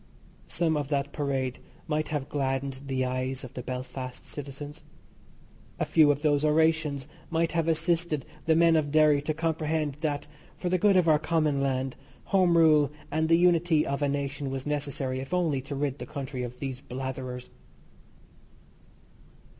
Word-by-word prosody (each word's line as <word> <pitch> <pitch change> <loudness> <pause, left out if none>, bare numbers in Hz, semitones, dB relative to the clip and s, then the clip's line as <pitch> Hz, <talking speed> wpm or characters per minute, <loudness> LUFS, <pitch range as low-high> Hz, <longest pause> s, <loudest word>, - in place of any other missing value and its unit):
Some 160 -1 +1
of 145 -2 -2
that 140 -1 -1
parade 135 -3 -2 0.3
might 155 -1 0
have 145 -3 -3
gladdened 135 -1 -2
the 130 -1 0
eyes 130 +1 -2
of 130 0 -9
the 125 - -5
Belfast 130 0 -6
citizens; 145 +2 -8 0.9
a - - 0
few 155 -3 +5
of 145 +1 +1
those 145 -1 +3
orations 155 -2 +2 0.2
might 165 0 +1
have 165 -1 0
assisted 165 -2 +1 0.2
the 160 - +5
men 165 0 +5
of 150 -2 +1
Derry 155 -2 +5
to 155 +2 -1
comprehend 160 -2 -1
that, 145 -3 -1 0.3
for 180 - -2
the 185 0 +2
good 200 0 +5
of 180 -2 +3
our 155 -2 +5
common 155 -3 +1
land, 130 -1 -1 0.4
Home 180 -3 +5
Rule 155 -3 +5 0.2
and 160 +2 +1
the 165 - +6
unity 170 -2 +3
of 140 +1 -2
a 145 - +2
nation 140 0 -2
was 135 0 -4
necessary 140 -3 -2
if 135 +7 -3
only 160 -7 +1
to 140 +2 -6
rid 140 -1 -2
the - - -6
country 140 -3 -5
of 125 0 -5
these 135 -2 -5
blatherers. 130 -1 -6
145 Hz, 165 wpm, -28 LUFS, 135-160 Hz, 0.9 s, the